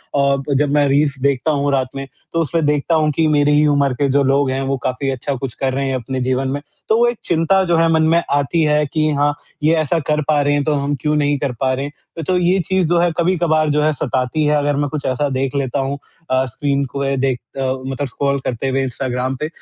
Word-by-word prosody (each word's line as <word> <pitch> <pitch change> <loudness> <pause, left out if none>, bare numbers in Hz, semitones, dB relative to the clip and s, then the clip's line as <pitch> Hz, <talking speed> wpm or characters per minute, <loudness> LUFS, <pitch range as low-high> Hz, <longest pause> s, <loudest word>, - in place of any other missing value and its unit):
अ, 140 -1 +3 0.2
जब 140 +1 +1
मैं 145 -1 +3
रील्स 140 +1 +2
देखता 140 +2 +1
हूँ, 145 -1 0
रात 130 -2 +1
में 135 0 -5 0.3
तो 165 - +1
उसमें 160 +1 0
देखता 150 +3 +1
हूँ 155 -1 +2
कि 160 -1 +2
मेरी 145 -1 +3
ही 150 - +4
उम्र 140 -2 +2
के 140 +3 0
जो 140 +1 +3
लोग 135 0 +2
हैं, 135 +1 -1
वो 135 0 -1
काफ़ी 130 +2 -2
अच्छा 135 +1 -2
कुछ 130 -1 -5
कर 130 +1 -2
रहे 135 +1 -1
हैं 135 - -1
अपने 130 +1 -4
जीवन 130 +1 0
में। 140 +2 -3 0.3
तो 220 - +4
वो 240 - +4
एक 240 -1 -1
चिंता 170 +3 +2
जो 170 -1 +2
है 165 0 +4
मन 160 -1 +3
में 165 +1 +3
आती 145 +4 +1
है 150 0 +2
कि 155 -1 +2
हाँ, 145 +1 +2 0.3
ये 155 +2 +4
ऐसा 155 +1 +1
कर 150 0 +1
पा 150 -2 +3
रहे 145 0 +1
हैं 145 0 +1
तो 155 - +1
हम 140 0 -1
क्यों 150 0 +1
नहीं 145 -1 +1
कर 140 -2 -1
पा 130 -1 +1
रहे 135 +2 -2
हैं? 155 +2 -10
तो 185 -1 +2
ये 180 +2 +2
चीज़ 190 -1 +1
जो 170 0 +2
है 175 0 +2
कभी-कभार 170 -3 +2
जो 150 +1 +2
है 155 - +3
सताती 130 +3 -1
है 150 0 +3
अगर 145 0 0
मैं 145 0 -1
कुछ 150 0 -5
ऐसा 135 +3 0
देख 135 0 -2
लेता 140 0 -1
हूँ 135 +1 -2 0.3
अ, 130 0 +2
स्क्रीन 140 +3 -1
को 140 - -3
देख 130 -1 0 0.2
अ, - - -2 0.2
मतलब 135 +1 -3
स्क्रॉल 140 +3 -1
करते 125 +2 -2
हुए 135 +1 0
इंस्टाग्राम 130 0 -2
पे। 155 - -2
145 Hz, 255 wpm, -18 LUFS, 135-155 Hz, 0.3 s, ही